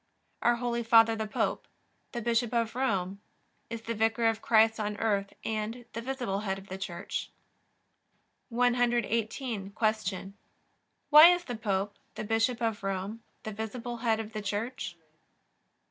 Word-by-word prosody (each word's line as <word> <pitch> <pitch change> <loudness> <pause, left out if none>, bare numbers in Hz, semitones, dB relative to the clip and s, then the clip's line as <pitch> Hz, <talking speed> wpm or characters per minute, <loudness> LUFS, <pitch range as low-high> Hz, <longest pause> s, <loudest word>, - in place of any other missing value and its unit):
Our 240 - +4
Holy 235 0 -1
Father 225 0 +6
the 220 -1 -3
Pope, - - -1 0.4
the 235 -2 -4
Bishop 235 0 +1
of 230 -1 +1
Rome, 200 -6 -1 0.5
is 230 -1 -6
the 230 - -2
Vicar 225 +1 +1
of 225 -1 +2
Christ 220 0 +4
on 210 -1 -2
earth 200 -2 0
and 220 +2 -3
the 230 - -4
visible 245 -6 -2
Head 195 -2 -2
of 195 +1 -12
the 190 - -5
Church. 175 -2 -4 1.2
118. 240 -3 0
Q. 215 -3 -1 0.8
Why 305 +2 +11
is 355 0 +4
the 245 -7 -5
Pope, 200 -2 -2 0.2
the - - -4
Bishop 225 +3 +1
of 225 -2 0
Rome, 195 +3 -3 0.2
the 215 - -4
visible 230 +3 -5
Head 225 -2 +1
of 220 0 -6
the 215 - -3
Church? 210 0 -3
225 Hz, 145 wpm, -30 LUFS, 205-235 Hz, 1.2 s, Why